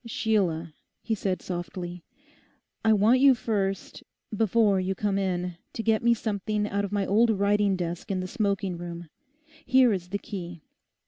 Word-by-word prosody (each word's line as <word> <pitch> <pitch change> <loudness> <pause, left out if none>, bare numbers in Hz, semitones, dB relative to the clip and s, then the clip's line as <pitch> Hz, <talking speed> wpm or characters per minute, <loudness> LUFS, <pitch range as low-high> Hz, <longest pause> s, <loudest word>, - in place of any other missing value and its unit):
'Sheila,' 190 -9 0 0.3
he 225 - -1
said 190 -4 -2
softly, 175 0 -5 0.8
'I 220 -1 +5
want 215 +5 +4
you 270 -1 +6
first, 195 -5 -2 0.3
before 215 -2 +3
you 190 +1 -1
come 200 0 0
in, 180 -2 -2 0.2
to 225 - -4
get 220 -1 +2
me 235 0 +4
something 210 -1 -2
out 200 0 -1
of 200 - -4
my 200 -1 0
old 225 +5 +3
writing 205 -1 +2
desk 175 -1 -4
in 190 -2 -1
the 185 - -3
smoking 195 -4 -1
room. 170 -1 -7 0.5
Here 255 -3 +4
is 180 -2 -4
the 200 - -1
key. 175 -6 -8
200 Hz, 160 wpm, -27 LUFS, 180-220 Hz, 0.8 s, you